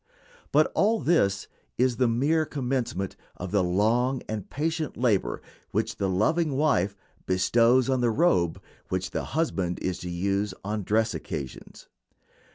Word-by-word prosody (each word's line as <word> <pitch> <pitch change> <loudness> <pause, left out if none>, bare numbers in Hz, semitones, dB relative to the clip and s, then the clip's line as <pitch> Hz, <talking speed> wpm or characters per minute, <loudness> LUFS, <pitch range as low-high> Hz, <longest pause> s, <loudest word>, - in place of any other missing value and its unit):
But - - +4
all 220 +2 +3
this 100 - +2 0.3
is 125 -1 +2
the 125 - +3
mere 140 +8 +2
commencement 125 - -2 0.2
of 90 0 -6
the 100 -2 +3
long 115 +8 +1
and 105 -3 -5
patient 160 0 -2
labor 100 - +1 0.3
which - - -1
the 95 - 0
loving 145 - +1
wife 100 - +2 0.3
bestows 115 +7 +3
on 130 -2 +1
the 120 - +3
robe 110 - +2 0.3
which 95 0 -2
the - - -2
husband 95 - 0
is 90 -1 -2
to 90 - -6
use 100 +3 -1
on 105 +2 -2
dress 110 +3 +1
occasions. 70 -4 -7
110 Hz, 145 wpm, -27 LUFS, 95-130 Hz, 0.3 s, But